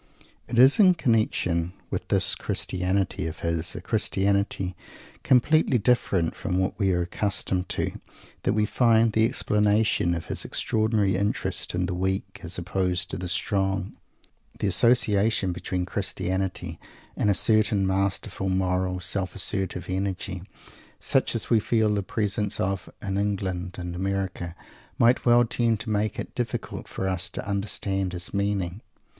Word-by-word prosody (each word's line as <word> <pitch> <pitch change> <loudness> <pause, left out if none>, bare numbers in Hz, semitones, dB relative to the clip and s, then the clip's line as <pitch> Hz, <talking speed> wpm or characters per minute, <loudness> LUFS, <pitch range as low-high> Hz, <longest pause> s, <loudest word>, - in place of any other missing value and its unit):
It 120 - -3
is 130 - +7
in 185 -3 +7
connection 90 - +1 0.2
with - - -3
this - - +2
Christianity 95 -2 -1
of 80 - -7
his, 85 0 -1
a - - -5
Christianity 100 -2 0 0.5
completely 135 +2 +4
different 100 -7 +1
from 90 -4 -2
what 95 0 +1
we 95 -2 +2
are 90 -1 +1
accustomed 95 0 -1
to, - - -1 0.5
that - - +1
we 105 -1 +2
find 115 -1 +3
the 110 0 +4
explanation 105 -5 +2
of 85 - -5
his - - -2
extraordinary 110 -3 +1
interest 100 -2 -2
in 90 +1 0
the 90 - -3
"weak" 95 +2 -2
as 85 0 -5
opposed 90 -1 -1
to - - -3
the 90 - -4
"strong." 95 0 -1 0.6
The - - -2
association 105 -2 +3
between 90 0 -3
Christianity 90 -2 -3 0.4
and 105 - +1
a 100 - +4
certain 110 0 +3
masterful, 95 0 -1
moral, 90 0 0
self 95 0 -2
assertive 95 -3 -1
energy, 95 0 -3 0.6
such - - +1
as - - -1
we 115 - +6
feel 110 -1 +2
the 100 - 0
presence 105 0 -2
of 95 0 -2
in 100 -1 -1
England 95 -3 -2
and 90 -1 -5
America, 95 -2 -3 0.4
might 120 +2 +3
well 120 0 +6
tend 115 -1 +1
to 110 - -4
make 105 -1 0
it - - -6
difficult - - -4
for 95 - -3
us 95 +1 -2
to - - -6
understand 100 -2 -2
his 90 0 -4
meaning. 100 -1 -1
95 Hz, 150 wpm, -26 LUFS, 90-105 Hz, 0.6 s, is